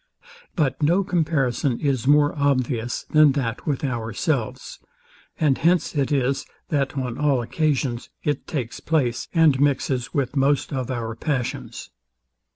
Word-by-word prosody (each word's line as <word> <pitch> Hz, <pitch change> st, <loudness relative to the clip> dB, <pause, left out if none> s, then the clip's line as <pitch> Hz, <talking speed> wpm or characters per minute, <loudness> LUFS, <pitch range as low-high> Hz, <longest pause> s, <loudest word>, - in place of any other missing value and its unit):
But 135 Hz, -5 st, 0 dB
no 175 Hz, +6 st, +3 dB
comparison 150 Hz, -9 st, 0 dB
is 135 Hz, -4 st, -1 dB
more 145 Hz, 0 st, +4 dB
obvious 130 Hz, -4 st, 0 dB
than 155 Hz, -2 st, +6 dB
that 120 Hz, -5 st, -3 dB
with 145 Hz, -2 st, -1 dB
ourselves; 125 Hz, +1 st, -2 dB, 0.6 s
and 150 Hz, -5 st, +2 dB
hence 170 Hz, +2 st, +2 dB
it 140 Hz, -1 st, 0 dB
is 135 Hz, -1 st, +1 dB, 0.3 s
that 140 Hz, -2 st, -1 dB
on 125 Hz, -3 st, -3 dB
all 140 Hz, -4 st, +2 dB
occasions 135 Hz, -2 st, -1 dB
it 145 Hz, -2 st, -2 dB
takes 125 Hz, -8 st, -4 dB
place, 135 Hz, -7 st, 0 dB
and 160 Hz, -6 st, +4 dB
mixes 135 Hz, -3 st, 0 dB
with 135 Hz, -1 st, -1 dB
most 140 Hz, +1 st, +1 dB
of 130 Hz, -2 st, -3 dB
our 115 Hz, -3 st, -3 dB
passions. 125 Hz, -1 st, -4 dB
135 Hz, 135 wpm, -23 LUFS, 125-150 Hz, 0.6 s, than